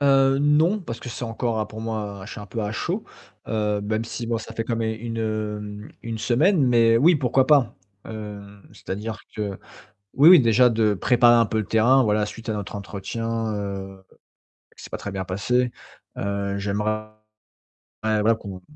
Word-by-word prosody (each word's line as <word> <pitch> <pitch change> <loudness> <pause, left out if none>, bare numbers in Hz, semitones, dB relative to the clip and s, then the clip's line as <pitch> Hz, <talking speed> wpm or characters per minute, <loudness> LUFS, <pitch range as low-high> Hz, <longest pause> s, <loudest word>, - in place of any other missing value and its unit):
Heu, 135 -1 +4
non, 155 +8 +3
parce 115 -9 -7
que - - -7
c'est 120 +1 -5
encore 115 -1 -2
pour 110 0 -9
moi, 105 -3 -4
je - - -9
suis - - -8
un 105 - -9
peu 115 +3 -5
à 105 - -2
chaud, - - -3 0.4
heu, 105 -2 0
même 110 +2 -2
si 115 0 -5
bon 115 -1 -1
ça - - -9
fait 115 - -1
quand 115 -1 -2
même 115 -1 -1
une, 115 0 -4
heu, 105 -1 -4
une 115 -1 -5
semaine, 150 - +3
mais 115 -2 +4
oui 160 +6 +5
pourquoi 130 0 +2
pas. 145 -5 +4 0.3
Heu, 105 -2 -7 0.3
c'est-à-dire 105 +3 -6 0.2
que 105 -2 -3 0.6
oui, 145 +5 +7
oui 180 -5 +10
déjà 125 +1 +5
de 110 -2 +2
préparer 120 +4 +4
un 115 -1 +4
peu 110 - -3
le 110 - 0
terrain 120 +6 +4
voilà 105 -1 +1
suite 115 +1 -9
à - - +1
notre 105 0 -5
entretien, 110 +3 -4
heu, 95 -1 -6 0.7
c'est - - -11
pas - - -3
très 100 - -6
bien 95 -1 -3
passé. 120 +7 0 0.5
Heu, 100 0 -2
j'aimerais 105 +2 -1 1.0
voilà 110 +1 +2
qu'on 95 -4 -9
110 Hz, 180 wpm, -23 LUFS, 105-120 Hz, 1.0 s, oui